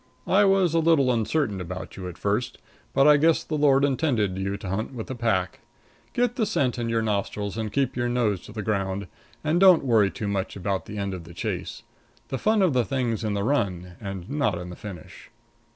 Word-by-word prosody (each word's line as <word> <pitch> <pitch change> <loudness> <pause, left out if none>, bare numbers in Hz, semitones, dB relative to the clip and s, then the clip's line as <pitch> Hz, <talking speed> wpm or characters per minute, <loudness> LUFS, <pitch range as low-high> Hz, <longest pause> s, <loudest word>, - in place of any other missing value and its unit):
I 205 +2 +4
was 195 -4 +3
a 165 - +3
little 160 -5 +4
uncertain 115 -3 0
about 90 +1 -7
you 95 -1 -6
at 85 - -10
first, 115 +5 -1 0.3
but 135 +1 +4
I 150 -1 +7
guess 165 +2 +3
the 160 - -6
Lord 145 -2 +4
intended 125 - +1
you 95 +1 -2
to 100 - -8
hunt 110 +7 -3
with 110 - -5
the - - -5
pack. 110 -7 -1 0.5
Get 245 0 0
the 220 - +2
scent 130 - 0
in 115 -1 -2
your 115 -1 +1
nostrils 100 -1 -2
and 110 -2 -3
keep 135 0 0
your 120 -1 0
nose 110 -6 0
to - - -11
the 105 -1 -5
ground, 100 -2 -1 0.4
and 155 +3 +2
don't 185 -6 +6
worry 110 -5 +4
too 105 - -5
much 100 -1 -2
about 100 0 -2
the 105 - -7
end 100 -1 -2
of 90 -3 -7
the 85 0 -12
chase. - - -4 0.5
The 135 - -3
fun 215 -1 +3
of 175 -6 +3
the 125 -1 +3
thing's 120 -4 -1
in 105 -2 -1
the 100 - -1
run 100 -9 -1
and 95 -3 -6
not 140 -9 0
in 90 0 -7
the - - -8
finish. 90 -2 -10
110 Hz, 220 wpm, -25 LUFS, 100-140 Hz, 0.5 s, I